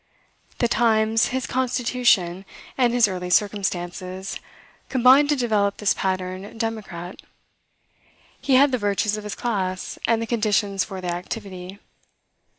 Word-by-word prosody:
The 240 - +2
times, 225 -1 +2
his 260 +1 -2
constitution, 245 -8 +1 0.3
and 245 -3 +3
his 240 -2 +4
early 180 -2 -4
circumstances, 185 -1 -1 0.5
combined 265 +3 +5
to 295 - +3
develop 215 -6 +1
this 210 - +2
pattern 185 +2 -3
democrat. 210 -6 -5 1.2
He 270 - +2
had 275 +2 +6
the 255 - 0
virtues 205 0 0
of 215 - -6
his 210 -1 -5
class, 190 -6 -3
and 230 -1 +3
the 230 - -2
conditions 210 -4 +1
for 190 -2 -7
their 175 -1 -2
activity. 185 0 -7
210 Hz, 130 wpm, -23 LUFS, 185-240 Hz, 1.2 s, had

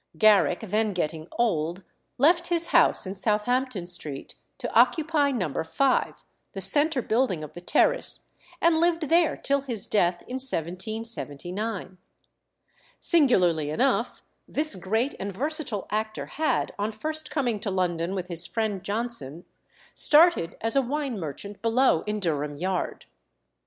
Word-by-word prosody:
Garrick, 210 -4 +4
then 215 0 -1
getting 160 -2 -3
old, 175 -5 -1 0.3
left 335 +6 +3
his 340 -1 0
house - - +4
in 190 - -4
Southampton 215 +1 -1
Street 155 -6 -2 0.2
to - - -6
occupy 290 +5 +3
No. 180 - -2
5, 255 +12 0 0.3
the 195 - -5
centre 275 - +4
building 220 -9 0
of 150 - -9
the 175 - -9
terrace, - - +1 0.4
and 330 -1 +3
lived 335 -2 +1
there 335 0 +3
till 280 0 0
his 240 -6 -2
death 175 -4 0
in 255 - -6
1779. 190 - -1 1.0
Singularly 180 - +2
enough, 250 - 0 0.2
this 305 -1 +1
great 220 +8 -1
and 200 +1 -4
versatile 270 - -2
actor 215 +1 -3
had, 310 +1 -1
on 210 +2 -1
first 310 +8 -3
coming 245 -8 -1
to 210 0 -3
London 180 -1 -1
with 185 -2 -3
his 170 -1 -1
friend 215 -4 -2
Johnson, 200 - -4 0.5
started 310 - +4
as 225 +3 0
a 275 - +4
wine 270 -3 -3
merchant 185 +6 -7
below 230 -6 +2
in 210 0 -2
Durham 150 -5 -2
Yard. 180 +4 -3
215 Hz, 135 wpm, -25 LUFS, 180-275 Hz, 1.0 s, Garrick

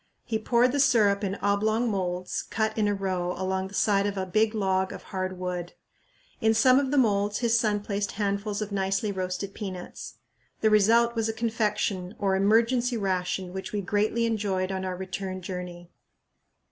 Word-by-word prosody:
He 220 - -1
poured 240 +3 +3
the 285 - -1
syrup 215 -7 +4
in 195 -1 -1
oblong 215 +4 +2
moulds 185 -3 -2
cut 220 0 -2
in 215 -2 +1
a 205 - +2
row 185 -2 -2
along 190 0 -1
the 195 - -10
side 200 -1 +2
of 200 -1 -3
a 190 - -1
big 215 +4 +1
log 190 -2 +1
of - - -8
hard 185 -1 -4
wood. 180 -1 -4 0.7
In 220 0 +3
some 255 +4 +5
of 275 -2 -1
the 290 - 0
moulds 205 -4 +2
his 235 -1 +2
son 210 -2 +1
placed 200 0 -3
handfuls 205 0 -1
of 210 - -8
nicely 195 +1 0
roasted 190 +1 -3
peanuts. 185 -4 -7 0.5
The 220 - +3
result 230 +3 +4
was 225 -1 -1
a - - -1
confection 210 -4 -1
or 195 -1 +1
"emergency 230 +5 +2
ration" 185 -2 -2
which 190 +2 -6
we 205 - -1
greatly 210 +4 +1
enjoyed 200 -4 -1
on 190 0 -3
our 185 -1 -3
return 190 0 -5
journey. 180 -1 -7
200 Hz, 180 wpm, -27 LUFS, 190-220 Hz, 0.7 s, some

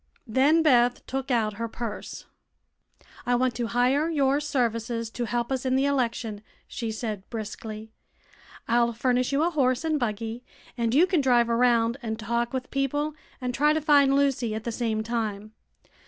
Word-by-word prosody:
Then 275 +7 +3
Beth 245 -4 +3
took 270 +1 -4
out 225 -4 +1
her 230 - -1
purse. 225 -2 -6 1.0
"I 245 - +1
want 255 0 +1
to 235 +1 -2
hire 255 +7 +2
your 280 -3 +2
services 235 -5 -1
to 240 - -3
help 240 +2 -2
us 260 -1 -1
in 260 -1 +1
the 270 +1 +2
election," 235 -6 -1 0.3
she 230 -5 -4
said, 215 -3 -5
briskly. 220 -1 -7 0.8
"I'll 235 0 +2
furnish 250 +2 +1
you 280 +3 +2
a 345 - +1
horse 255 -3 +1
and 315 -2 0
buggy 225 0 -3 0.3
and 235 0 0
you 325 +5 +6
can 365 -5 +1
drive 240 -3 +3
around 235 0 +3
and 220 -2 -3
talk 235 +2 -1
with 255 -1 -4
people 290 +2 -1 0.3
and 250 -1 -3
try 295 +4 +3
to 315 - +1
find 285 -3 +4
Lucy 265 -6 +1
at 220 - -5
the 235 - -3
same 225 -2 -1
time. 215 -2 -3
245 Hz, 170 wpm, -26 LUFS, 230-275 Hz, 1.0 s, you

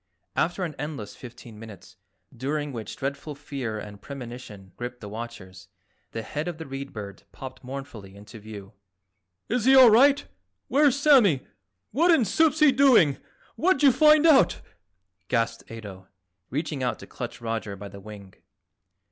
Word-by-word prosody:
After 175 +2 0
an 165 -4 -3
endless 145 -8 -6
fifteen 120 -3 -12
minutes, 100 -4 -12 0.4
during 145 +3 -3
which 110 -3 -6
dreadful 140 +2 -5
fear 135 -6 -5
and 105 -1 -9
premonition 120 -8 -9
gripped 125 0 -6
the 105 - -9
watchers, 100 -5 -9 0.4
the 115 - -6
head 150 +8 -4
of 175 -3 -4
the 160 - -7
Read 135 0 -7
Bird 100 -2 -8
popped 130 0 -10
mournfully 125 -7 -8
into 105 +2 -12
view. 105 -1 -10 0.7
"Is 240 0 -1
he 265 +1 +6
all 255 -4 +9
right? 275 +6 +5 0.4
Where's 280 +1 +3
Sammy? 240 - +5 0.5
What 325 +10 +2
in 320 -9 +5
soup's 315 - +2
he 305 -2 +7
doing? 250 - +4 0.4
What'd 335 -4 +1
you 275 - +8
find 305 +4 +5
out?" 305 -5 +5 0.7
gasped 115 -1 -1
Ato, 100 -4 -10 0.4
reaching 150 0 -3
out 125 -3 -1
to - - -11
clutch 120 -1 -7
Roger 115 -3 -4
by 100 +1 -9
the 100 0 -11
wing. 100 -2 -12
130 Hz, 155 wpm, -25 LUFS, -, 0.7 s, all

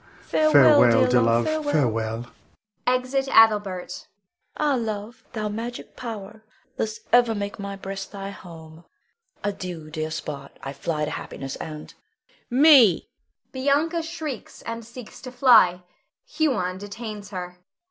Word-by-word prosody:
Farewell, 145 -7 +5
dear 125 -1 +4
love, 115 0 +3
farewell! 120 - 0 0.6
[Exit 255 +2 +1
Adelbert. 205 -7 +3
Bianca. - - -40 0.5
Ah, 295 -2 +2
love, 225 -1 -4
thou 215 -2 -2
magic 230 +3 -6
power, 220 -2 -8 0.3
thus 215 0 -3
ever 240 -2 +5
make 205 0 -5
my 200 0 -5
breast 195 0 -7
thy 200 -1 -6
home. 165 -3 -12 0.6
Adieu, 180 -6 -5
dear 155 0 -3
spot! 140 -3 -7
I 135 - -5
fly 150 +2 -2
to 150 - -5
happiness 135 -2 -6
and 155 -1 -8 0.6
Huon. 255 +2 +1
Me 260 - +7 0.4
[Bianca 290 +6 +1
shrieks, 315 - -7
and 230 0 -5
seeks 235 0 -11
to 255 - -8
fly. 210 -9 +5 0.4
Huon 255 - -1
detains 205 0 -7
her.] 180 -3 -5
Bianca. 180 - -24
205 Hz, 130 wpm, -24 LUFS, 160-245 Hz, 0.6 s, Me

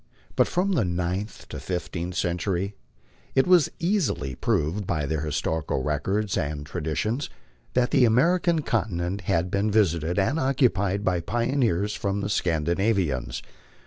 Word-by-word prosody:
But - - +4
from 190 +3 0
the 170 - +2
ninth 90 +3 -3
to - - -6
the - - -7
fifteenth 90 0 -4
century 90 +2 -1 0.6
it 135 - +5
is 180 -5 +5
easily 165 - 0
proved 95 - -1
by 75 -3 0
their 80 +1 -1
historical 75 -2 -1
records 95 +8 -1
and 75 -3 -3
tra 85 +4 -5
ditions 110 - -1 0.5
that 125 -1 +2
the 130 -3 +5
American 165 +7 +3
continent 95 -6 -1
had 85 +2 +1
been 100 +2 +1
visited 85 -5 +2
and 120 +11 +2
occupied 105 - +1
by 90 -2 +2
pioneers 115 -1 0
from 100 -1 -2
the 100 - -2
Scandinavians. 85 - 0
95 Hz, 145 wpm, -25 LUFS, 85-115 Hz, 0.6 s, it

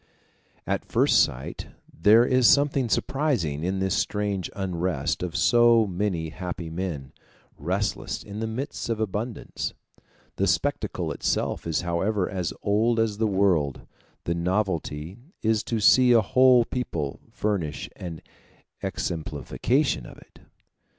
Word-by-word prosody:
At - - -1
first - - +4
sight 65 +2 -5 0.3
there 110 +8 +5
is 130 -2 +4
something 140 -1 +3
surprising 105 - 0
in 95 +2 -1
this 95 -1 0
strange 100 -3 -1
unrest 90 -6 -2
of 90 -1 -4
so 115 +5 +5
many 90 -4 -2
happy 85 -1 -6
men, 80 -6 -4 0.4
restless 95 +8 -2
in 100 +1 -7
the 110 - -2
midst 120 +3 -4
of 115 -2 -1
abundance. 110 +2 -3 0.6
The - - +1
spectacle - - -1
itself - - -1
is 80 0 0
however 90 +3 0
as 90 -3 -3
old 110 +3 +2
as 110 -2 0
the 110 - +2
world; 95 -9 +1 0.4
the 85 - -1
novelty 85 -1 -2 0.2
is 110 -1 +2
to 115 - -1
see 125 +4 +6
a 115 - +6
whole 125 +3 +5
people 85 - -3
furnish 90 -9 -2
an 85 -3 -7 0.6
exemplification 85 - -1
of - - -12
it. - - -19
100 Hz, 130 wpm, -25 LUFS, 85-115 Hz, 0.6 s, see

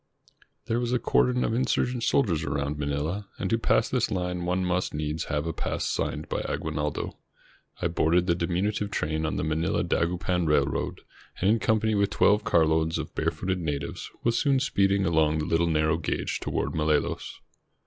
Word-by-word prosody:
There 115 - 0
was 120 0 -1
a - - +4
cordon 125 +1 +2
of - - 0
insurgent 125 0 0
soldiers 95 - +2
around 70 0 -2
Manila, 75 +8 -2
and 95 - -3
to 115 - +2
pass - - +2
this - - 0
line 90 -1 -2
one 90 +1 0
must 90 -2 -1
needs 75 +1 -2
have 75 +1 -2
a 80 - -2
pass - - -3
signed - - -2
by - - -2
Aguinaldo. 75 -1 -3 0.7
I - - +3
boarded 85 +1 +2
the 85 - +3
diminutive 95 +5 -1
train 80 -4 -1
on - - -2
the - - -1
Manila 80 +1 0
Dagupan 90 0 0
Railroad, 75 -1 0 0.4
and 95 +3 +3
in 115 - +2
company 110 -1 +2
with 100 -1 +2
twelve 105 +1 +3
carloads 80 -2 +2
of - - -5
barefooted 95 0 -1
natives 75 -4 -4
was 115 0 +2
soon 140 -2 +3
speeding 100 -7 +2
along 80 -2 +2
the 75 - -1
Httle 85 0 +1
narrow 80 +1 +2
gauge - - -2
toward - - -2
Malolos. 75 -1 -1
85 Hz, 175 wpm, -27 LUFS, 80-100 Hz, 0.7 s, a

